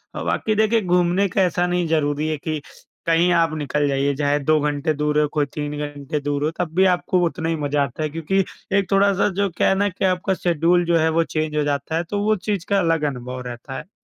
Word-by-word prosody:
अ, - - -4
बाकी 215 - 0
देखिए 220 +1 +3
घूमने 180 +1 +2
का 195 - +1
ऐसा 180 -1 +1
नहीं 175 -1 0
ज़रूरी 150 -1 0
है 155 -1 -1
कि 155 +1 -3 0.5
कहीं 165 +2 +3
आप 165 -2 +2
निकल 145 0 0
जाइए, 140 0 0
चाहे 145 0 +1
2 155 +2 +2
घंटे 145 +1 0
दूर 150 0 0
हो 150 - +3
कोई 150 -2 +1
3 150 -1 -4
घंटे 145 0 -4
दूर 145 0 -2
हो, 155 - 0
तब 165 -3 -2
भी 190 +1 +5
आपको 180 0 0
उतना 165 -1 -2
ही 165 - 0
मज़ा 145 -1 0
आता 140 +4 -4
है, 155 - -1
क्योंकि 165 +5 0 0.3
एक 195 -1 -1
थोड़ा-सा 195 0 +3
जो 200 - +1
क्या - - +3
है 195 - +3
ना 205 +1 +1
कि 190 +1 -3
आपका 185 +1 +1
शेड्यूल 175 0 +2
जो 170 0 +3
है 160 0 +2
वो - - +4
चेंज 155 -1 -3
हो 150 - +2
जाता 145 +2 -2
है 170 - 0
तो 205 0 -1
वो 215 +1 +3
चीज़ 195 -4 -1
का 200 -1 +3
अलग 165 -4 +1
अनुभव 125 0 -7
रहता 120 +2 -7
है। - - -9
160 Hz, 245 wpm, -21 LUFS, 145-180 Hz, 0.5 s, भी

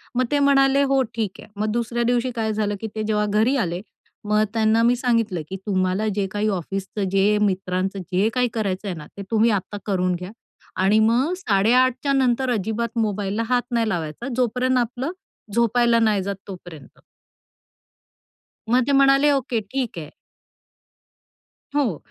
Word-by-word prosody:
मग 255 +1 +2
ते 290 - +2
म्हणाले, 275 -1 +4
"हो, 275 -1 +2
ठीक 215 -4 -3
आहे," - - -13
मग 215 0 0
दुसऱ्या 235 +1 -1
दिवशी 245 +1 +1
काय 220 -1 -1
झालं 210 -1 -1
की 225 - -3
ते 215 - -2
जेव्हा 210 -1 0
घरी 215 +6 +2
आले 175 +1 -4 0.5
मग 210 +1 +3
त्यांना 220 0 +3
मी 240 +1 +4
सांगितलं 230 -8 0
की, 190 - -4
"तुम्हाला 190 +1 0
जे 200 -1 0
काही 210 +1 -1
ऑफिसचं 195 +4 -4
जे 195 +2 +3
मित्रांचं 190 -1 -1
जे 190 +4 +2
काही 250 -1 +2
करायचंय 200 -3 -2
ना, 155 -3 -9
ते - - -5
तुम्ही 225 +1 +3
आता 190 +3 -9
करून 185 -3 0
घ्या 180 +2 -7 0.5
आणि 205 +3 +4
मग 240 +9 +2
8.30च्या 255 - +2
नंतर 260 -1 +1
अजिबात 220 +2 -2
मोबाईलला 210 0 -1
हात 250 -1 +3
नाही 230 -2 +1
लावायचा 170 - -4
जोपर्यंत 255 +1 +1
आपलं 250 +5 -1 0.4
झोपायला 235 +1 +3
नाही 215 -4 +2
जात 200 +1 -3
तोपर्यंत." 175 -7 -11 1.7
मग 250 +2 +4
ते - - +2
म्हणाले, 275 +1 +5
"ओके, 255 -4 0
ठीक 235 0 -4
आहे." 150 -2 -8 1.7
हो, 250 - +1
220 Hz, 155 wpm, -22 LUFS, 195-245 Hz, 1.7 s, म्हणाले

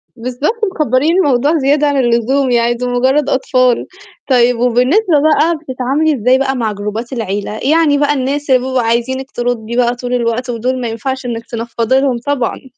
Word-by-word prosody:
بالضبط 255 - -3
مكّبرين 305 +3 +1
الموضوع 290 -1 +2
زيادة 290 +1 +2
عن 285 -1 0
اللزوم 250 +2 +1
يعني، 235 0 +2
دُول 245 +1 -4
مجرد 265 +4 +1
أطفال، 255 -2 +1 0.4
طيب 245 -2 +3
وبالنسبة 275 - +2
بقى 315 +2 +2
بتتعاملي 285 +2 -1
إزاي 250 +3 +4
بقى 270 0 0
مع 225 -3 -1
جروبات 210 +5 -5
العيلة، 210 -1 -4
يعني 315 -3 +3
بقى 290 0 +2
الناس 280 +2 -2
اللي 255 -1 +5
بيبقوا 260 0 -1
عايزينِك 240 +4 -2
تردي 240 -1 -3
بقى 245 0 +1
طول 245 0 -5
الوقت، 245 +1 -1
ودُول 250 +2 -2
ما 240 - -2
ينفعش 260 +3 -4
إنِك 230 -1 -4
تنفضّي 235 +2 -1
لهم 265 -3 0
طبعًا؟ 265 0 -3
255 Hz, 170 wpm, -14 LUFS, 235-280 Hz, 0.4 s, اللي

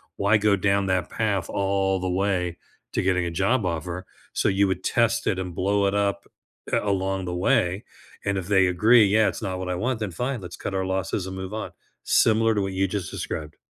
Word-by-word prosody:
why 100 +2 +3
go 105 -1 +3
down 100 +1 +1
that 95 -2 0
path 100 -6 -1
all 95 -1 0
the 95 - -2
way 90 -2 0 0.4
to - - +1
getting 90 -1 +1
a 85 - -3
job 100 +6 +1
offer 90 +1 -3 0.3
so - - +1
you 100 0 +3
would 95 -1 -2
test 115 0 +1
it 95 - +1
and 90 -2 -5
blow 100 +1 +1
it 100 - 0
up, 100 -1 0 0.5
uh, - - +3
along 95 -1 -1
the 90 0 -3
way 90 +1 +1 0.4
and 100 -1 0
if 95 -2 -4
they 95 -2 +4
agree, 105 +5 +5
"Yeah, 105 +1 +3
it's - - -6
not 95 -3 -3
what 95 0 -4
I 90 - -1
want," 115 +5 -1
then, 105 -4 -3
"Fine, 125 +5 -3
let's 90 - -8
cut - - -5
our 95 0 0
losses 95 0 -2
and 95 - -6
move 95 +1 -6
on," 110 - -4 0.3
similar 115 0 +3
to 105 - +1
what 95 -1 -2
you 95 +1 +1
just 95 -2 -3
described. 75 -1 -5
95 Hz, 225 wpm, -25 LUFS, 90-100 Hz, 0.5 s, agree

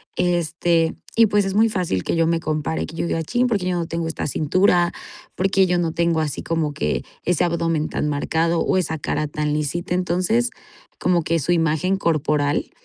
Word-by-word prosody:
este, 170 -1 +1 0.2
y 230 - +6
pues 205 -1 +2
es 195 0 -2
muy 225 +1 +4
fácil 175 - -1
que - - -1
yo 165 -1 +2
me 165 0 +1
compare, 155 0 -2
que 165 - -10
yo 170 - -2
diga: 165 -1 -1
"Chin, 245 +9 +1
¿por 230 -4 +1
qué 180 - -3
yo 175 - 0
no 165 -1 -2
tengo 165 0 -3
esta 160 - -3
cintura 175 +4 +2 0.4
por 195 +1 +1
qué, 195 -1 +4
yo 180 0 +1
no 165 -2 0
tengo 170 -1 +1
así 150 -2 -2
como 160 -3 -1
que 75 - -1 0.2
ese 175 -2 +1
abdomen 165 -2 0
tan - - -2
marcado, 165 +3 0
o - - +1
esa 160 -3 -1
cara 150 +2 -1
tan 150 0 -2
lisita?" 160 +4 -2
Entonces, 185 +7 +1 0.5
como 175 -2 +2
que 165 +1 0
su 160 +4 -1
imagen 165 +3 +1
corporal 150 -4 0
170 Hz, 205 wpm, -22 LUFS, 155-180 Hz, 0.5 s, y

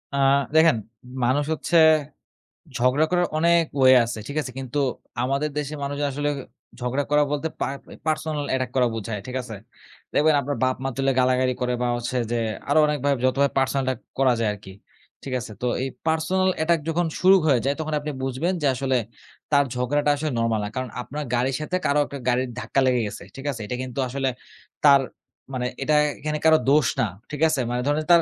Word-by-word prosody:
আ - - -1 0.4
দেখেন 160 -4 +6 0.5
মানুষ 140 +4 +2
হচ্ছে 170 +2 0 1.0
ঝগড়া 125 +5 +3
করার 175 -1 +2
অনেক 170 +1 +4 0.2
ওয়ে 130 0 +7
আছে। 115 0 -4
ঠিক 145 - -5
আছে? 130 - -6
কিন্তু 130 +1 -5 0.5
আমাদের 140 +4 0
দেশের 150 +1 -3
মানুষজন 145 +1 -2
আসলে 145 +2 -1 0.5
ঝগড়া 125 +3 -1
করা 150 0 +5
বলতে 150 +2 -1
পা - - 0 0.4
পার্সোনাল 155 -2 -1
অ্যাটাক 130 -1 0
করা 125 -2 +4
বোঝায়। 110 -1 -4
ঠিক 130 - -6
আছে? 115 -3 -8 0.6
দেখবেন 155 +1 +4
আপনার 140 +1 -3
বাপ 130 0 +2
মা 135 - 0
তুলে 135 0 +2
গালাগালি 130 0 +2
করে 125 0 0
বা 125 - +1
হচ্ছে 120 +1 -3
যে 120 - +1 0.3
আরো 145 - +4
অনেকভাবে 145 -2 +1
যতভাবে 140 +2 +2
পার্সোনাল 135 0 +1
অ্যাটাক 130 -3 -2 0.2
করা 130 -2 +4
যায় 115 -2 +1
আরকি। 100 -1 -11 0.5
ঠিক 135 - -5
আছে? 120 -2 -8
তো - - -1 0.2
এই 130 - -1 0.2
পার্সোনাল 170 +4 +1
অ্যাটাক 165 +1 +2
যখন 170 +2 +1
শুরু 190 +1 +6
হয়ে 135 -5 +4
যায় 140 +1 +1
তখন 155 0 -3
আপনি 150 +1 -4
বুঝবেন, 135 +8 -1
যে 145 - +2
আসলে 130 0 0 0.6
তার 140 -1 +5
ঝগড়াটা 135 +4 0
আসলে 150 +1 -2
নরমাল 115 -1 +1
না। - - -4
কারণ 130 -1 -3
আপনার 150 +4 -5
গাড়ির 125 +2 0
সাথে 155 +4 -3
কারো 145 +1 +3
একটা 140 - -7
গাড়ির 125 +1 +1
ধাক্কা 135 - -1
লেগে 125 -1 +3
গেছে। - - -8
ঠিক 135 +1 -9
আছে? 120 -5 -7
এটা 125 - -4
কিন্তু 130 0 -5
আসলে 135 +1 -1 0.5
তার 140 -2 +7 0.5
মানে 125 -1 -2 0.2
এটা 150 - +2 0.2
এখানে 150 0 -2
কারো 160 0 +7
দোষ 145 -3 +4
না। - - +3 0.3
ঠিক 150 0 -5
আছে? 155 -3 0
মানে 125 0 -1
ধরুন 145 +1 +1
তার 170 - +7
140 Hz, 195 wpm, -24 LUFS, 125-150 Hz, 1.0 s, ওয়ে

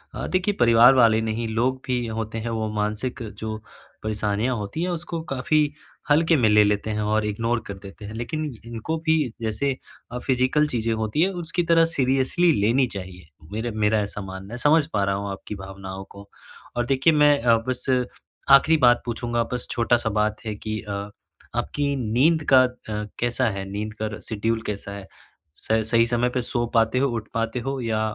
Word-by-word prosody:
अ, - - -4
देखिए 185 +3 +1
परिवार 120 +2 +7
वाले 115 -3 +5
नहीं 110 +1 -2
लोग 120 +4 0
भी 125 -2 -1
होते 110 0 -4
हैं 115 +1 -4
वो 110 -1 -2
मानसिक 110 +5 -2 0.2
जो 110 0 -4 0.5
परेशानियाँ 110 +3 -1
होती 105 +9 -4
हैं 180 - -1
उसको 170 -1 -4
काफ़ी 135 +3 +1 0.5
हल्के 160 +3 +4
में 120 - +3
ले 105 0 +6
लेते 105 +1 0
हैं - - -1
और 105 +1 +1
इग्नोर 115 +3 -1
कर 100 - -5
देते 100 +2 -10
हैं 105 - -7
लेकिन 120 +7 -3 0.2
इनको 120 +8 -4
भी 160 -1 +4 0.2
जैसे 115 +5 -1 0.4
अ, 125 - -4
फिज़िकल 130 +4 +2
चीज़ें 115 -4 -1
होती 110 +6 -1
हैं 185 - +4 0.2
उसकी 175 +2 -1
तरह 165 0 +6
सीरियसली 135 +6 +2
लेनी 120 +6 +3
चाहिए, 90 -2 -9 0.3
मेरा 110 +3 -3
मेरा 110 0 +2
ऐसा 105 0 -5
मानना 95 +2 -8
है, - - -4
समझ 150 +4 +4
पा 100 -2 +2
रहा 100 0 +1
हूँ 100 0 -4
आपकी 100 +2 -7
भावनाओं 95 0 -8
को। 100 0 -13 0.5
और 120 0 0
देखिए 135 +5 +3
अ, - - +1
मैं 140 -6 +5
बस 130 -1 -2 0.7
आखिरी 140 +4 +7
बात 120 -4 +5
पूछूँगा 120 0 -1
बस 125 - -3
छोटा-सा 120 -1 +1
बात 105 0 0
है 110 -1 -3
कि 110 +1 -4
अ, 105 - -8 0.6
आपकी 145 -1 -1
नींद 135 +7 +2
का 130 - +9
अ, 110 -4 -4
कैसा 120 +1 +1
है? 100 -2 -4
नींद 105 +1 -4
का 105 -1 -3
शेड्यूल 110 +1 -2
कैसा 100 -1 -5
है? 100 -1 -8 0.6
स 110 0 +3
सही 115 0 +4
समय 120 +1 +1
पर 125 0 -1
सो 120 0 -1
पाते 115 +2 +3
हो 140 - +3
उठ 110 - -6
पाते 115 +2 -1
हो 135 +2 -3
या 115 -2 -1
115 Hz, 190 wpm, -24 LUFS, 105-130 Hz, 0.7 s, का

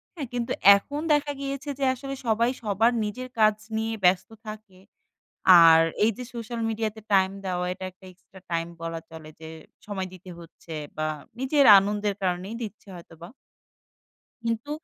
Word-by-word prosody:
হ্যাঁ? 290 -6 -5
কিন্তু 240 -1 -3 0.3
এখন 285 +9 -6
দেখা 295 0 +1
গিয়েছে 275 0 -5
যে - - -2
আসলে 275 +1 -6
সবাই 230 +2 +2
সবার 220 +3 +2
নিজের 250 +5 -5
কাজ 215 -1 +5 0.2
নিয়ে 225 0 -2
ব্যস্ত 180 +3 +3 0.2
থাকে। 215 -3 -10 0.9
আর 165 0 +8 0.2
এই 225 - +4
যে 250 - -7
social 235 0 -5
media 220 0 -1
তে - - -9
টাইম 190 -1 +4 0.2
দেওয়া 180 -1 -2
এটা 185 - -8
একটা 185 +1 -23
extra 185 +1 -18
time 165 0 -1
বলা 165 0 -4
চলে 160 -1 -11
যে, 160 - -9 0.4
সময় 190 -2 -4
দিতে 185 0 -12
হচ্ছে 165 -1 -12 0.2
বা 155 0 -1 0.3
নিজের 275 +2 +2
আনন্দের 205 +1 -1
কারণেই 185 +4 -2
দিচ্ছে 215 -1 -9
হয়তোবা। 170 0 -12 1.2
কিন্তু 230 +5 -2
210 Hz, 160 wpm, -25 LUFS, 180-235 Hz, 1.2 s, আর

